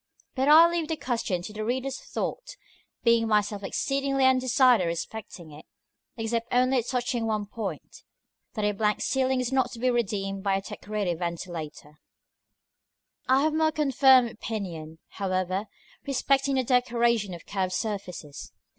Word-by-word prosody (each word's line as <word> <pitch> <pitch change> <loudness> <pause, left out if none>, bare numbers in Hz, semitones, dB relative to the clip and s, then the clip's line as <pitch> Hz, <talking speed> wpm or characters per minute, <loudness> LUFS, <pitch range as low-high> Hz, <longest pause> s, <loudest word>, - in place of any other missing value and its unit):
But 265 +1 0
I 320 +3 +9
leave 340 -2 -2
the 320 - -1
question 230 - -2
to 210 - -8
the 215 0 -4
reader's 260 +4 -2
thought, - - -5 0.5
being 230 -1 +4
myself 210 -1 +1
exceedingly 275 +5 0
undecided 255 - +4
respecting 170 -1 -6
it: 150 +1 -13 0.5
except 230 +1 -2
only 255 +1 +3
touching 245 -1 -2
one 215 -2 -1
point 210 0 -7 0.5
that 215 -2 -1
a 210 - +2
blank 210 0 0
ceiling 265 -1 +1
is 250 0 -2
not 260 -2 +1
to 235 - -8
be 255 +1 +2
redeemed 195 -4 -2
by 195 -1 +1
a 195 - -1
decorated 200 -3 -4
ventilator. 170 -3 -5
§ - - -20
IV. 150 - -27 1.3
I 260 +1 +5
have 310 0 +1
a - - 0
more 315 0 +3
confirmed 265 -5 +4
opinion, 175 -8 -6
however, 185 +1 -2 0.4
respecting 275 0 +1
the 260 - +2
decoration 235 -5 +1
of 170 - -13
curved 190 -2 -2
surfaces. 185 -9 -5
230 Hz, 155 wpm, -27 LUFS, 195-260 Hz, 1.3 s, I